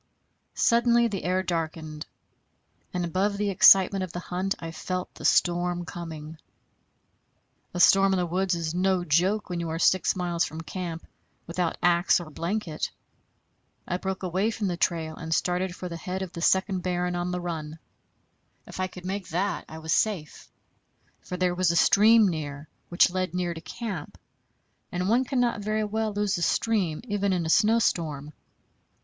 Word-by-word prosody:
Suddenly 235 0 +3
the 195 -3 -4
air 185 +1 +1
darkened, 160 -3 -4 0.8
and 180 -1 -2
above 195 +4 0
the 205 0 0
excitement 195 +1 +6
of 185 - -5
the 175 - -5
hunt 185 +2 -2
I 165 -1 -7
felt 180 +2 -4
the - - -9
storm 175 0 +2
coming. 160 -2 -8 1.4
A - - -2
storm 195 +2 +6
in 190 - +2
the 180 - +1
woods 180 +1 0
is 165 -1 -3
no 185 0 +1
joke 180 +6 +1
when 175 -1 -3
you 170 -1 -3
are 160 - -2
six 185 +2 +3
miles 175 -2 0
from 160 +2 -5
camp 170 -1 -6 0.4
without 170 0 -2
axe 175 +1 +4
or 165 -3 -9
blanket. 170 0 -3 1.0
I 180 - -1
broke 190 +1 -4
away 185 +4 0
from 220 -2 -3
the 175 - -1
trail 165 -2 -1
and 160 0 -2
started 180 0 -1
for 180 - -6
the 170 -1 -6
head 185 +2 -4
of 185 - -7
the 170 - -6
second 190 +1 +2
barren 180 0 -1
on 175 0 -2
the 180 0 -2
run. 160 -3 -5 0.9
If - - -10
I 185 - 0
could 180 -1 -12
make 190 0 -4
that, 190 +4 -2
I 160 - -8
was 160 0 -2
safe; 185 -9 -1 0.7
for 180 - -6
there 180 -1 +1
was 180 -1 +1
a 170 - +1
stream 215 +6 +6
near, 150 -3 -4 0.2
which 175 +1 +4
led 185 -1 -2
near 175 -1 -1
to 165 - -9
camp; 185 0 -6 0.7
and 180 +1 -2
one 245 +4 +3
cannot 245 -4 0
very 215 +1 -1
well 215 +1 -1
lose 205 -3 -1
a - - -6
stream, 190 -5 0
even 205 -4 -1
in 175 -3 0
a 160 - 0
snowstorm. 165 -10 +1
180 Hz, 175 wpm, -26 LUFS, 170-195 Hz, 1.4 s, excitement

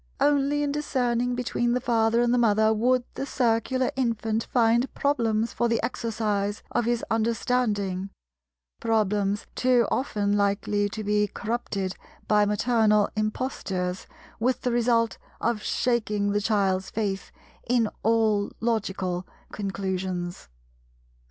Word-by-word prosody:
Only 290 0 +2
in 285 - 0
discerning 245 -4 0
between 240 -1 0
the 250 - +1
Father 230 -1 +2
and 240 0 +2
the 245 - +3
Mother 220 -1 +4
would 245 +3 +2
the - - -4
Circular 250 +1 +1
infant 225 -3 -1
find 235 +1 +2
problems 230 -6 +1
for 240 - +1
the 230 -1 +1
exercise 210 -4 -2
of 240 - 0
his 240 0 0
understanding—problems 205 - -1
too 250 -2 +3
often 205 -6 0
likely 205 0 +1
to 215 +1 -5
be 210 0 +2
corrupted 200 -3 -3 0.3
by 210 -1 +4
maternal 210 -1 +3
impostures 200 -5 -2 0.3
with 250 +3 +1
the 250 - 0
result 235 -1 +2 0.2
of 230 -2 0
shaking 210 -5 0
the 205 0 +1
child's 195 -3 +1
faith 200 -3 -3 0.4
in 240 -2 +3
all 220 -2 +2
logical 190 -5 -1 0.2
conclusions. 190 - -3
220 Hz, 120 wpm, -26 LUFS, 205-240 Hz, 0.4 s, Mother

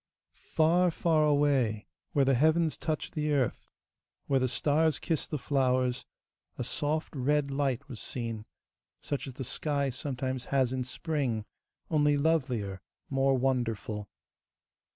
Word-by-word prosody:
Far, 170 +3 +4
far 160 -1 +2
away, 140 -8 +2 0.3
where 140 -2 +4
the 135 - +4
heavens 160 +4 +3
touch 155 -2 -3
the 150 -1 -1
earth, 135 -4 0 0.6
where 135 -1 +2
the 130 - +2
stars 150 +5 +2
kiss 160 -4 -1
the 150 - -2
flowers, 130 -2 +1 0.5
a - - -2
soft 155 +2 -2
red 140 +1 +1
light 140 -1 -1
was 125 -6 -8
seen, 115 -3 -5 0.5
such 145 0 -3
as 130 - -8
the 135 - -4
sky 140 +1 -1
sometimes 130 -1 -3
has 130 -2 +1
in 130 -1 -2
spring, 130 -6 -2 0.5
only 150 -2 +3
lovelier, 125 - 0 0.3
more 135 0 +3
wonderful. 115 -5 -1
135 Hz, 130 wpm, -30 LUFS, 125-150 Hz, 0.6 s, Far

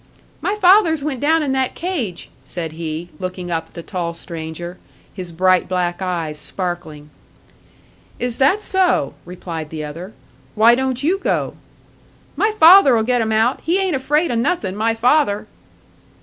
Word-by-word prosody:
"My 405 - -1
father's 360 -6 +4
went 280 -4 -3
down 315 +3 +2
in 280 - -1
that 265 -1 -1
cage," 280 - -4
said 165 -3 -5
he, 160 +1 -5
looking 185 -1 -5
up 165 -1 -2
at - - -28
the 170 - -7
tall 170 -3 -4
stranger, 170 +1 -7 0.3
his 180 -3 -7
bright 185 +2 +2
black 180 -1 -1
eyes 165 -5 -3
sparkling. 160 -6 -5 1.1
"Is 245 -1 -3
that 290 +11 +3
so!" 370 - +1
replied 170 -3 -7
the 155 -1 -6
other. 170 +7 -8 0.4
"Why 225 +2 +6
don't 260 +1 -1
you 365 +6 +1
go?" - - -1 0.8
"My 430 - +2
father'll 315 - +7
get 245 +1 +1
'em 220 0 -1
out. 220 +3 +1
He 340 +4 +1
ain't 380 -5 0
afraid 295 +4 +1
o' - - -1
nothin', 230 - -1
my 225 +2 0
father!" 235 -3 +2
215 Hz, 155 wpm, -19 LUFS, 175-290 Hz, 1.1 s, father'll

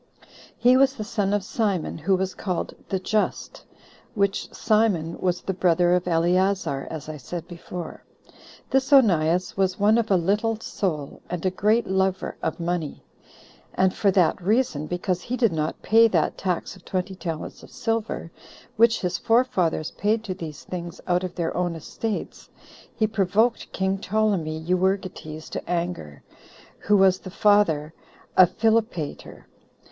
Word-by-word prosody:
He 250 +1 +5
was 270 0 +4
the 215 - -4
son 205 -2 -1
of 205 -1 +1
Simon, 200 -6 -1
who 190 +5 +2
was 190 0 -2
called 185 -3 -3 0.2
The 190 - 0
Just: 210 +3 -2 0.5
which 200 -2 0
Simon 210 -7 +1
was 180 -1 0
the 190 - -2
brother 175 -1 +3
of 180 0 +1
Eleazar, 175 -3 +1
as 155 -3 -7
I 155 -1 -6
said 165 +5 -7
before. 175 0 -8 0.7
This 270 +2 +1
Onias 180 - +4
was 190 -1 0
one 215 +3 +4
of 225 - -1
a 195 - +4
little 210 +5 0
soul, 155 -11 -3
and 180 0 -4
a 185 - +2
great 215 +5 +2
lover 190 0 0
of - - -2
money; 170 -3 -3 0.7
and 190 0 +3
for 200 - +2
that 185 -2 +2
reason, 195 - +1
because 180 +1 -2
he 250 +6 -3
did 230 -8 +2
not 155 -1 -3
pay 230 +1 +6
that 170 -8 +1
tax 180 -1 -2
of 190 - -17
twenty 185 0 -3
talents 165 -4 -6
of - - -14
silver, 225 -6 -3 0.5
which 230 0 +4
his 180 -1 -1
forefathers 225 -10 +1
paid 215 +2 0
to 195 -4 -3
these 160 -5 -8
things 175 -2 -6
out 180 0 +1
of 180 -1 -5
their 170 -2 -2
own 175 -1 -1
estates, 210 +7 -5 0.5
he 220 - +2
provoked 215 +3 +1
king 190 0 -1
Ptolemy 195 -7 0
Euergetes 180 -3 -1
to - - -6
anger, 170 - -3 0.6
who 210 0 +3
was 190 -1 +4
the 185 - -9
father 180 -7 +2 0.4
of 185 -2 +7
Philopater. 220 -8 -1
185 Hz, 155 wpm, -24 LUFS, 170-210 Hz, 0.7 s, of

